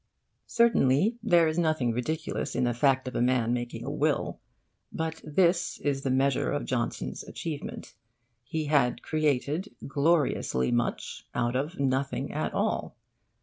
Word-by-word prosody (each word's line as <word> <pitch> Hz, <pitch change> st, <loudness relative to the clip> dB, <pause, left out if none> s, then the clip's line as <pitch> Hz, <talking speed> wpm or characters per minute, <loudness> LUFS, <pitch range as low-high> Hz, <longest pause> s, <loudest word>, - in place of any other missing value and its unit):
Certainly, 225 Hz, -, +3 dB
there 175 Hz, -7 st, +4 dB
is 155 Hz, +2 st, 0 dB
nothing 155 Hz, -7 st, +1 dB
ridiculous 125 Hz, +7 st, -3 dB
in -, -, +1 dB
the 120 Hz, -1 st, +1 dB
fact 130 Hz, +1 st, +2 dB
of 130 Hz, -, -5 dB
a -, -, +1 dB
man 120 Hz, -1 st, +2 dB
making 120 Hz, -1 st, -4 dB
a 140 Hz, -, -3 dB
will. 150 Hz, 0 st, 0 dB, 0.5 s
But 160 Hz, 0 st, -3 dB
this 170 Hz, +3 st, +2 dB
is 140 Hz, -2 st, -1 dB
the 135 Hz, -, -2 dB
measure 135 Hz, 0 st, +2 dB
of -, -, -2 dB
Johnson's -, -, -2 dB
achievement. 155 Hz, -4 st, -6 dB, 0.5 s
He 155 Hz, +6 st, -3 dB
had 135 Hz, -5 st, +2 dB
created 155 Hz, +4 st, 0 dB
gloriously 140 Hz, -, +1 dB
much 120 Hz, 0 st, -2 dB
out 120 Hz, +1 st, 0 dB
of 145 Hz, +6 st, -2 dB
nothing 135 Hz, 0 st, -1 dB
at -, -, -1 dB
all. -, -, -1 dB
140 Hz, 145 wpm, -28 LUFS, 125-160 Hz, 0.5 s, there